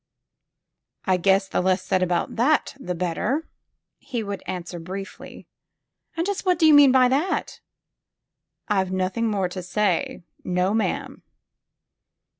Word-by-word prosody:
I 185 Hz, -2 st, +2 dB
guess 195 Hz, +2 st, +2 dB
the -, -, -1 dB
less 185 Hz, 0 st, +1 dB
said 185 Hz, 0 st, 0 dB
about 175 Hz, -1 st, 0 dB
that 275 Hz, +7 st, +2 dB
the 180 Hz, -8 st, -4 dB
better," 185 Hz, -, -2 dB, 0.5 s
he 245 Hz, -5 st, -4 dB
would 200 Hz, -2 st, -5 dB
answer 175 Hz, -1 st, -5 dB
briefly. 190 Hz, +4 st, -8 dB, 0.7 s
And 335 Hz, -, 0 dB
just 405 Hz, 0 st, -2 dB
what 365 Hz, -3 st, +2 dB
do 325 Hz, -, +3 dB
you 310 Hz, -, +7 dB
mean 290 Hz, -2 st, +8 dB
by 255 Hz, -1 st, +5 dB
that?" 290 Hz, +9 st, -1 dB, 1.1 s
I've 190 Hz, -3 st, 0 dB
nothing 190 Hz, +5 st, -1 dB
more 200 Hz, -4 st, 0 dB
to 185 Hz, +1 st, -6 dB
say. 185 Hz, -1 st, -1 dB, 0.2 s
No, 180 Hz, +2 st, 0 dB
ma'am." 220 Hz, 0 st, -2 dB
195 Hz, 135 wpm, -24 LUFS, 185-255 Hz, 1.1 s, mean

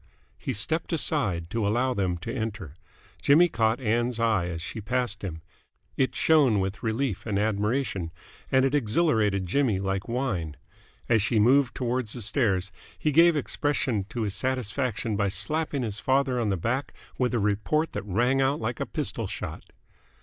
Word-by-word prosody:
He -, -, -3 dB
stepped 155 Hz, -, 0 dB
aside 105 Hz, -, 0 dB
to 115 Hz, -3 st, 0 dB
allow 125 Hz, +5 st, +1 dB
them 95 Hz, -5 st, -1 dB
to -, -, -3 dB
enter. 110 Hz, -, -4 dB, 0.5 s
Jimmy 160 Hz, +5 st, +6 dB
caught 115 Hz, -5 st, +1 dB
Ann's 120 Hz, 0 st, 0 dB
eye 110 Hz, -7 st, +2 dB
as 85 Hz, -2 st, -4 dB
she 100 Hz, +6 st, -6 dB
passed 120 Hz, 0 st, -1 dB
him. 80 Hz, -4 st, -5 dB, 0.5 s
It 130 Hz, -, 0 dB
shone 140 Hz, -10 st, +4 dB
with 95 Hz, +1 st, -3 dB
relief 115 Hz, -1 st, -2 dB
and 100 Hz, -3 st, 0 dB
admiration, 105 Hz, -2 st, 0 dB, 0.4 s
and 130 Hz, 0 st, +4 dB
it 135 Hz, -, 0 dB
exhilarated 110 Hz, -, +2 dB
Jimmy 115 Hz, +1 st, +1 dB
like 95 Hz, 0 st, -2 dB
wine. 110 Hz, -, -2 dB, 0.5 s
As 115 Hz, -3 st, +3 dB
she 110 Hz, +3 st, +1 dB
moved 125 Hz, +4 st, +4 dB
towards 125 Hz, -3 st, -2 dB
the 120 Hz, -, -6 dB
stairs, 100 Hz, -5 st, 0 dB, 0.3 s
he 150 Hz, -, 0 dB
gave 165 Hz, +3 st, +6 dB
expression 135 Hz, -7 st, 0 dB
to 115 Hz, -1 st, -3 dB
his 100 Hz, -2 st, -2 dB
satisfaction 125 Hz, 0 st, -1 dB
by 100 Hz, 0 st, +1 dB
slapping 140 Hz, -, -1 dB
his 105 Hz, -3 st, -3 dB
father 130 Hz, -1 st, +1 dB
on 115 Hz, -3 st, 0 dB
the 95 Hz, -, 0 dB
back 125 Hz, -, -2 dB, 0.2 s
with 125 Hz, -1 st, +1 dB
a -, -, +2 dB
report 105 Hz, +10 st, 0 dB
that -, -, -2 dB
rang 120 Hz, +7 st, +1 dB
out 135 Hz, +2 st, +1 dB
like 115 Hz, +1 st, -3 dB
a -, -, -2 dB
pistol -, -, -3 dB
shot. -, -, -6 dB
115 Hz, 170 wpm, -27 LUFS, 100-130 Hz, 0.5 s, Jimmy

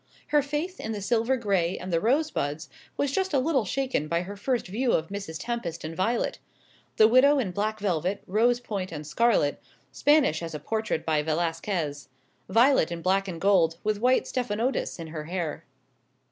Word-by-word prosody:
Her 295 Hz, 0 st, +4 dB
faith 300 Hz, +6 st, -3 dB
in 220 Hz, -, -4 dB
the 210 Hz, -, -4 dB
silver 235 Hz, +5 st, +1 dB
gray 195 Hz, -6 st, 0 dB
and 185 Hz, -1 st, -6 dB
the 165 Hz, -, +3 dB
rosebuds 225 Hz, -, 0 dB, 0.3 s
was 285 Hz, -2 st, 0 dB
just 380 Hz, 0 st, 0 dB
a -, -, +4 dB
little 265 Hz, -4 st, +1 dB
shaken 260 Hz, -, -1 dB
by 170 Hz, +2 st, 0 dB
her 200 Hz, +3 st, -7 dB
first 245 Hz, +4 st, -1 dB
view 235 Hz, +7 st, 0 dB
of 160 Hz, 0 st, 0 dB
Mrs. 200 Hz, -5 st, -5 dB
Tempest 200 Hz, -9 st, -4 dB
and 160 Hz, +1 st, -5 dB
Violet; 225 Hz, +7 st, 0 dB, 0.6 s
the 215 Hz, -, +7 dB
widow 265 Hz, +5 st, +5 dB
in 225 Hz, -9 st, -1 dB
black 215 Hz, +3 st, -2 dB
velvet, 185 Hz, -1 st, -1 dB
rose 235 Hz, +5 st, +2 dB
point, 200 Hz, -6 st, -4 dB
and 150 Hz, -2 st, -6 dB
scarlet 155 Hz, -2 st, +2 dB, 0.3 s
Spanish 275 Hz, -, +3 dB
as 165 Hz, -2 st, -5 dB
a -, -, -4 dB
portrait 220 Hz, +3 st, -2 dB
by 155 Hz, -2 st, +2 dB
Velasquez; 160 Hz, -1 st, -2 dB, 0.4 s
Violet 235 Hz, -, +4 dB
in 170 Hz, -1 st, -5 dB
black 195 Hz, +1 st, +2 dB
and 170 Hz, -3 st, -5 dB
gold, 170 Hz, -4 st, +3 dB
with 210 Hz, -1 st, 0 dB
white 255 Hz, +1 st, +4 dB
stephanotis 245 Hz, 0 st, -2 dB
in 165 Hz, -, -5 dB
her 155 Hz, -1 st, -6 dB
hair. 170 Hz, -2 st, -4 dB
200 Hz, 180 wpm, -27 LUFS, 165-245 Hz, 0.6 s, the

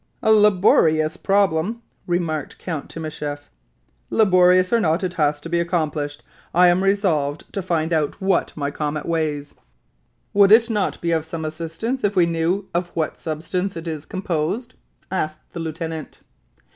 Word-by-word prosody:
"A 220 Hz, -, +4 dB
laborious 180 Hz, -7 st, +4 dB
problem," 200 Hz, +3 st, +1 dB, 0.2 s
remarked 170 Hz, -4 st, -2 dB
Count 160 Hz, -5 st, -5 dB
Timascheff. 150 Hz, -2 st, -6 dB, 0.6 s
"Laborious 185 Hz, -2 st, +4 dB
or 235 Hz, -, +5 dB
not, 170 Hz, -1 st, +1 dB
it 180 Hz, -1 st, -2 dB
has 150 Hz, -4 st, +1 dB
to 165 Hz, -, -7 dB
be 170 Hz, 0 st, 0 dB
accomplished. 155 Hz, -4 st, -2 dB, 0.3 s
I 180 Hz, +1 st, +7 dB
am 180 Hz, +2 st, +2 dB
resolved 170 Hz, -8 st, 0 dB
to 195 Hz, -, -2 dB
find 170 Hz, -2 st, -1 dB
out 155 Hz, +1 st, 0 dB
what 195 Hz, -1 st, +1 dB
my 145 Hz, -1 st, -2 dB
comet 150 Hz, +1 st, -3 dB
weighs." 150 Hz, -3 st, -2 dB, 0.8 s
"Would 200 Hz, 0 st, +5 dB
it 230 Hz, +2 st, +6 dB
not 210 Hz, -3 st, -1 dB
be 170 Hz, -, 0 dB
of 160 Hz, -2 st, +1 dB
some 160 Hz, 0 st, -5 dB
assistance, 165 Hz, +11 st, -4 dB
if 205 Hz, -1 st, +1 dB
we 180 Hz, -2 st, +5 dB
knew 170 Hz, +4 st, -1 dB
of 175 Hz, +1 st, -1 dB
what 160 Hz, -2 st, -1 dB
substance 175 Hz, +4 st, -3 dB
it 165 Hz, +1 st, -7 dB
is 155 Hz, -2 st, -5 dB
composed?" 190 Hz, +5 st, -2 dB, 0.4 s
asked 155 Hz, -4 st, -4 dB
the 170 Hz, -, -5 dB
lieutenant. 160 Hz, -1 st, -5 dB
170 Hz, 155 wpm, -22 LUFS, 155-190 Hz, 0.8 s, I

